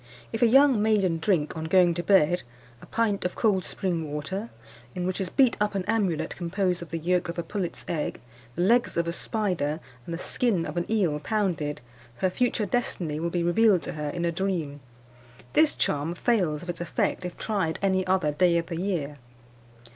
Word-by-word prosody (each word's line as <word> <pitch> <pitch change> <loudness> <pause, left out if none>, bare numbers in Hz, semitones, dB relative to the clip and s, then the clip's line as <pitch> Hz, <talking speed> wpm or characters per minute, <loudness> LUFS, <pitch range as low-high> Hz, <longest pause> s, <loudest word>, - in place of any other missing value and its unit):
_ - - -26 0.3
If 225 - -3
a 240 - +6
young 270 -1 +5
maiden 200 -6 +2
drink, 165 -3 +1
on 160 0 -4
going 175 +1 +4
to 175 - -2
bed, 175 -2 +4 0.4
a - - -13
pint 220 -3 0
of 180 - -2
cold 200 -5 +2
spring 165 -5 -2
water, 190 +10 -4 0.5
in 180 -1 -2
which 185 +2 -2
is 185 - -2
beat 265 -4 +4
up 210 -1 +1
an 190 -2 -1
amulet, 205 -7 0
composed 180 0 -1
of 170 - -8
the 165 - -3
yolk 175 +2 0
of 170 - -5
a 170 - -1
pullet's 175 -1 -4
egg, 155 -3 -2 0.4
the 175 - 0
legs 235 +2 +3
of 170 0 +1
a 170 - -1
spider, 175 -8 -1 0.3
and 170 - -3
the - - -4
skin 195 -1 0
of 150 - -6
an 175 0 -2
eel 180 -9 +1
pounded, 160 -6 -1 0.3
her 185 +9 0
future 235 0 0
destiny 180 -8 -1
will 170 +1 -1
be 175 0 -1
revealed 190 +1 +4
to - - -4
her 150 -1 -3
in 170 +3 -2
a 170 - +1
dream. 170 -5 -2 0.7
This 310 -1 +4
charm 150 +4 0
fails 175 -9 +1
of 175 - -9
its 170 - -9
effect 175 - -1
if 180 -1 -6
tried 195 -7 -1
any 190 -1 +2
other 185 -5 +2
day 170 +3 +3
of 165 - -1
the 165 -1 -5
year. 150 -7 -2
180 Hz, 205 wpm, -26 LUFS, 165-200 Hz, 0.7 s, a